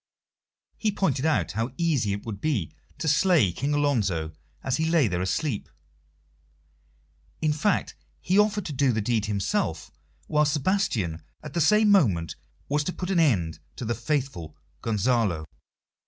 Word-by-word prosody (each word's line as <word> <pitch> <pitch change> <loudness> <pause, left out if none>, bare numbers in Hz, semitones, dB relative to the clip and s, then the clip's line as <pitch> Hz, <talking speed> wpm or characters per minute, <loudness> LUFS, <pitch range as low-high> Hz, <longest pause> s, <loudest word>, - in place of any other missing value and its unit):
He 215 - +1
pointed 160 -8 0
out 160 - +1
how 115 +4 -3
easy 150 - +1
it 100 +1 -4
would 105 -3 -6
be 125 - -1 0.2
to - - -3
slay 155 - +4
King 140 - -1
Alonso 100 - 0 0.3
as 135 - 0
he 160 0 0
lay 165 -7 +4
there 90 -2 -1
asleep; 105 - -2 1.7
in 155 -1 +1
fact, 180 +7 0 0.3
he 185 +3 +2
offered 210 -2 +2
to 150 - -4
do 135 -1 +2
the 110 - -1
deed 110 -1 0
himself, 100 -2 -1 0.3
while 150 0 +2
Sebastian 145 - 0 0.2
at 150 -2 -8
the 170 - 0
same 210 +6 +5
moment 95 - +3 0.3
was 145 +1 +1
to - - -1
put 180 +1 -4
an 180 - +2
end 95 - +2 0.2
to 125 - -6
the 120 - 0
faithful 120 - -3 0.2
Gonzalo. 110 -6 0
135 Hz, 155 wpm, -26 LUFS, 105-160 Hz, 1.7 s, same